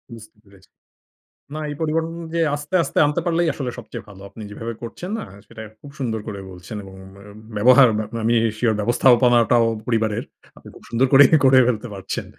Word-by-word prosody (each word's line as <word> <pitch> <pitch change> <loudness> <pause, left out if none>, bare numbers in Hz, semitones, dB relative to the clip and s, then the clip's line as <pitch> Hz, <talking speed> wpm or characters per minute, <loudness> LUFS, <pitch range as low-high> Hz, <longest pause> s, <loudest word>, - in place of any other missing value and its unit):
বুঝতে 110 -1 -15
পেরেছি। 100 -1 -22 0.8
না, 155 - -5
এই 145 - -5
পরিবর্তন 160 +1 0
অনুযায়ী 165 0 -3
আস্তে, 150 +5 -5
আস্তে - - -7
আনতে 145 0 -1
পারলেই 170 0 +1
আসলে 130 -4 -4
সবচেয়ে 115 - -9
ভালো। 95 -2 -14
আপনি 110 - -12
যেভাবে 115 +3 -6
করছেন 175 - -7
না - - -6 0.2
সেটা 110 - -11 0.2
খুব 145 - -12
সুন্দর 115 -4 -2
করে 100 -2 -6
বলছেন, 90 +4 -10
এবং 95 -1 -12 0.2
অ্যা 100 - -15 0.3
ব্যবহার, 130 +4 +6
বা 110 - -1 0.2
আমি 115 +2 +2 0.2
sure 110 -1 +1
ব্যবস্থাপনাটাও 120 +1 +3 0.2
পরিবারের। 110 -3 -1 0.3
আপনি - - -16
খুব - - -16
সুন্দর 120 +3 +1
করেই, 135 0 +8 0.2
করে 130 0 +6
ফেলতে 125 0 -2
পারছেন। 95 -1 -5
120 Hz, 180 wpm, -21 LUFS, 110-145 Hz, 0.8 s, করেই